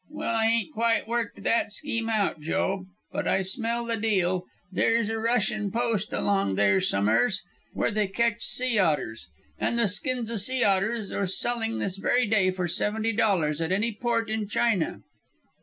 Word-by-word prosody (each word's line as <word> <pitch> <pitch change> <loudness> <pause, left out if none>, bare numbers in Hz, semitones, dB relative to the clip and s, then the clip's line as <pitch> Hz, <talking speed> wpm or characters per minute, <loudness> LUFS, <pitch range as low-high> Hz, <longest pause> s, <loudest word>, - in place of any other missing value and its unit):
"Well, 230 - -3
I 225 -1 +2
ain't 230 +6 0
quite 230 -1 +1
worked 235 0 -3
that 230 -2 +1
scheme 230 +2 -3
out, 210 -7 0
Joe. 190 +4 -1 0.2
But - - -3
I 190 - +2
smell 230 +4 -2
the 230 0 -1
deal. 185 -4 0 0.3
There's 225 +3 +1
a 225 0 -2
Russian 220 -2 0
post 225 -3 -1
along 195 - 0
there 100 -1 +3
some'eres. 110 - +2 0.3
Where - - 0
they 210 -1 0
catch 230 +3 0
sea 250 -4 +1
otters. 145 - 0 0.3
And 235 - 0
the 235 -3 +4
skins 235 +3 0
o' 230 - -2
sea 255 +5 +3
otters 200 +2 +1
are 200 - -1
selling 225 +4 0
this 195 -1 -3
very 245 +5 +2
day 205 -3 +3
for 185 -1 -2
seventy 220 +6 0
dollars 170 -8 +1
at 165 +2 -1
any 210 +5 +1
port 230 +1 -1
in 215 -1 -2
China." 215 -4 0
215 Hz, 175 wpm, -26 LUFS, 190-230 Hz, 0.3 s, the